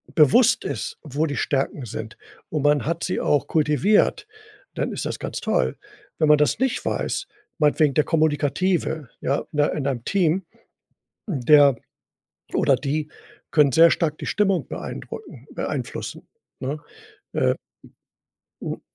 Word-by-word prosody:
bewusst 240 - +5
ist, - - -4
wo 150 +1 -1
die 145 - -3
Stärken 135 -1 -1
sind 110 +1 -7 0.3
und 150 -3 -2
man 145 0 +3
hat 170 +2 -2
sie 180 - -1
auch 145 - +2
kultiviert, 160 - +2 0.5
dann - - -2
ist - - -4
das - - -4
ganz - - -4
toll. - - 0 0.4
Wenn 155 - +3
man 150 - +7
das 150 - +2
nicht 265 -1 0
weiß 390 - -2 0.3
meinetwegen 150 -1 +3
der 150 - +2
Kommunikative, 160 0 0
ja, 140 - 0
in 150 - -2
ein 145 - +1
in 140 -2 -2
einem 125 -4 -2
Team, 185 -1 +1 0.8
der, 145 - +5 0.8
oder 140 - +3
die 145 +3 -2 0.4
können 150 -3 +4
sehr 165 +5 +7
stark 155 -3 0
die - - -5
Stimmung 195 -4 +1
beeindrucken 440 - -8
beeinflussen, - - -5 0.3
ne? 140 +3 -3 0.5
Äh, - - +2 1.1
hm - - -5
150 Hz, 140 wpm, -23 LUFS, 140-170 Hz, 1.1 s, man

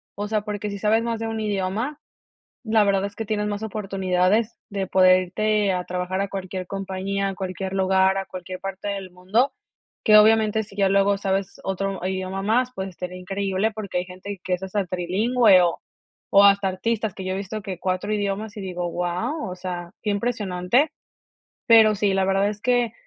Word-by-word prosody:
O 205 +1 -3
sea, 215 0 0
porque 210 0 -4
si 200 - -6
sabes 220 +2 +2
más 230 -1 -2
de 225 - -3
un 225 0 -3
idioma, 210 +7 -2 0.6
la 220 -2 +3
verdad 195 -1 +2
es 200 0 -7
que 225 - -4
tienes 210 -1 -1
más 205 +1 -3
oportunidades 195 0 0
de 195 -2 -3
poder 185 -1 +5
irte 210 +2 +1
a 180 -1 -2
trabajar 180 +1 -3
a 200 - -1
cualquier 190 -1 -5
compañía, 195 +1 -2
a 195 - -5
cualquier 190 0 -4
lugar, 190 0 +3
a 195 - -2
cualquier 185 0 -7
parte 195 +1 -5
del 195 -2 -4
mundo, 190 +9 0 0.5
que 215 -1 +7
obviamente 220 0 +4
si 200 -1 -15
ya 200 -1 +2
luego 200 +1 +3
sabes 195 0 -2
otro 195 -1 -3
idioma 190 0 -3
más, 245 +5 +1
pues, 190 -2 -4
estaría 180 0 -7
increíble 195 +3 -1
porque 205 -4 -3
hay 180 - -4
gente 185 +1 -8
que 185 - -1
es 180 - -11
hasta 190 +1 -1
trilingüe 190 +4 +3
o 170 -1 +1 0.5
o 200 0 +8
hasta 200 -1 +5
artistas 220 +2 -2
que 190 - -7
yo 185 - -1
he - - -2
visto 205 +2 -5
que 190 -2 -5
4 185 +3 -2
idiomas 205 +1 -2
y 205 - -6
digo: 180 -2 -3
"Guau", 180 - -2
o 180 - -6
sea, 175 -2 -5
qué 210 - -1
impresionante. 210 - 0 0.7
Pero 220 -2 +7
sí, 200 -1 +1
la 190 0 +1
verdad 195 +1 +2
es 210 0 -8
que 245 -2 +1
195 Hz, 195 wpm, -23 LUFS, 185-215 Hz, 0.7 s, o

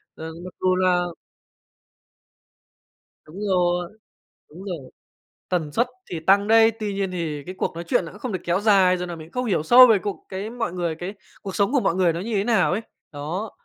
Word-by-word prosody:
ờ, 160 - -8 0.2
mặc 185 - -9
dù 185 0 +3
là 180 -1 +2 2.2
Đúng 175 +6 -10
rồi, 175 -2 +1 0.6
đúng 175 +6 -11
rồi, 165 -9 -6 0.6
tần 160 -5 -1
suất 235 - +2 0.2
thì 165 -3 -4
tăng 200 +4 +3
đấy, 225 0 +6
tuy 210 -2 -2
nhiên 195 -1 -1
thì 160 -5 -4
cái 185 - -6
cuộc - - -2
nói 170 - -6
chuyện 170 - +1
nó 165 - -9
không 240 +1 -4
được 185 - -1
kéo 175 +3 +1
dài, 195 -4 +4
rồi 180 0 -4
nà 175 - -6
mình 160 -1 -10
cũng - - -27
không 250 0 -2
hiểu 195 -10 0
sâu 245 +10 +9
về 225 -4 +5
cuộc 200 +2 -6
cái 195 +3 -5
mọi 230 -6 -3
người 175 -3 -2
cái 175 +5 -6 0.3
cuộc 195 -2 -6
sống 200 +4 +2
của 280 - +3
mọi 170 - +1
người 180 -2 +3
nó 170 - -4
như 225 +3 -4
thế 200 -1 +1
nào 225 -7 +2
ấy. 195 - 0 0.3
Đó, 165 +9 -4
185 Hz, 215 wpm, -23 LUFS, 170-205 Hz, 2.2 s, sâu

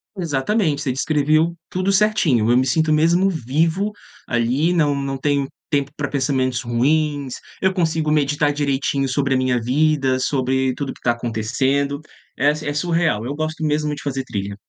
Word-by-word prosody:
Exatamente, 160 -1 0
você 130 - 0
descreveu 155 +4 +1
tudo 185 +2 0
certinho. 180 - +2
Eu 120 - +5
me 130 +1 +2
sinto 155 +3 +2
mesmo 170 +5 +3
vivo 160 - 0 0.4
ali, 125 +8 +1
não 150 -5 +2
não 140 -1 -3
tenho 140 -1 0 0.2
tempo 140 -2 0
para 145 - -1
pensamentos 130 -3 0
ruins, 140 +3 0 0.3
eu 190 0 +1
consigo 160 -4 0
meditar 145 0 +1
direitinho 140 -1 0
sobre 140 +1 0
a 130 - +3
minha 130 -1 +1
vida, 135 +1 +1
sobre 130 0 0
tudo 140 -1 -4
o - - -8
que - - -19
está 120 - +1
acontecendo, 130 +5 -1 0.4
é 140 +3 +3
é 150 -1 -4
surreal, 165 -8 0
eu 135 - -3
gosto 155 +1 -4
mesmo 150 0 0
de 145 - -10
fazer 135 -2 -2
trilha. 100 -4 -4
145 Hz, 170 wpm, -20 LUFS, 130-155 Hz, 0.4 s, Eu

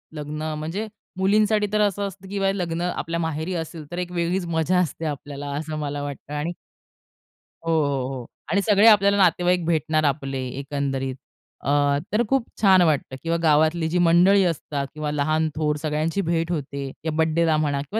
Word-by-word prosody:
लग्न 150 +1 -4
म्हणजे 175 +8 -4 0.3
मुलींसाठी 210 +2 +3
तर 210 - +3
असं 200 0 +1
असतं 195 0 -11
किंवा 195 -1 0
हे 195 +1 0
लग्न 170 -1 -2
आपल्या 170 -1 -2
माहेरी 160 +2 -2
असेल, 160 -1 -5
तर 175 - -5
एक 180 0 -4
वेगळीच 175 +1 -1
मजा 165 +2 +1
असते 165 -1 -2
आपल्याला 145 -1 -5
असं 155 +1 -4
मला 145 -1 -3
वाटतं 145 0 -7
आणि 155 +4 -2 1.1
हो, 165 - 0
हो, 140 -5 +1
हो. 130 -2 -6 0.3
आणि 200 - +3
सगळे 205 +1 +5
आपल्याला 200 -2 +6
नातेवाईक 180 -2 +3
भेटणार 155 -1 +1
आपले 135 -2 -1 0.2
एकंदरीत 135 -2 -2 0.5
अ, 145 0 +3 0.2
तर 215 - +3
खूप 270 -3 +1
छान 190 -3 +6
वाटतं 150 -5 +1
किंवा 165 0 0
गावातली 160 +1 +3
जी 180 - 0
मंडळी 185 +4 +5
असतात 145 -4 -2
किंवा 155 -1 -3
लहान 155 +2 +1
थोर 150 -1 0
सगळ्यांची 155 +4 -1
भेट 165 -1 -1
होते 140 -3 -3
किंवा 160 -1 -2
बर्थडेला 160 0 +2
म्हणा 145 -2 0
किंवा 200 +10 -3
160 Hz, 175 wpm, -23 LUFS, 150-180 Hz, 1.1 s, आपल्याला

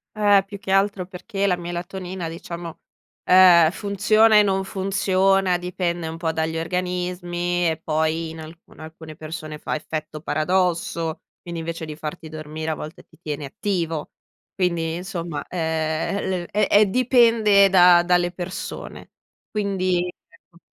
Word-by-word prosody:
Eh, 205 -2 +4
più 200 0 -9
che 190 - -10
altro, 195 -1 +1
perché 195 +2 -3
la 180 - +2
melatonina, 175 0 -5
diciamo, 170 0 -8 0.4
ehm, 175 -3 +7
funziona 215 +3 +3
e 210 - +7
non 195 -1 0
funziona, 190 -1 +1
dipende 175 -1 -3
un 160 0 -6
po' 165 -1 -1
dagli 160 0 -2
organismi 175 0 -2
e 160 0 -2
poi 160 +1 0
in 160 0 -9
alcu 160 +2 -12
alcune 160 0 -11
persone 155 0 -7
fa - - -4
effetto 155 0 -5
paradosso, 170 0 -1 0.2
quindi 170 -2 -6
invece 165 0 -5
di 155 -1 -7
farti 160 +1 -7
dormire, 155 0 -6
a 160 - -1
volte, 155 +1 -9
ti 160 - -23
tiene 150 -3 -5
attivo. 165 0 -3 0.4
Quindi, 170 -3 -1
insomma, 175 -4 -5
ehm, 160 +1 -1 0.3
l - - -10
è 210 - +2
è 210 +1 +5
dipende 225 -3 +4
da 180 -2 +6
dalle 175 0 +2
persone, 175 +1 -7 0.4
quindi 185 -4 0 0.2
ecco. 170 - -24
175 Hz, 140 wpm, -22 LUFS, 160-190 Hz, 0.4 s, ehm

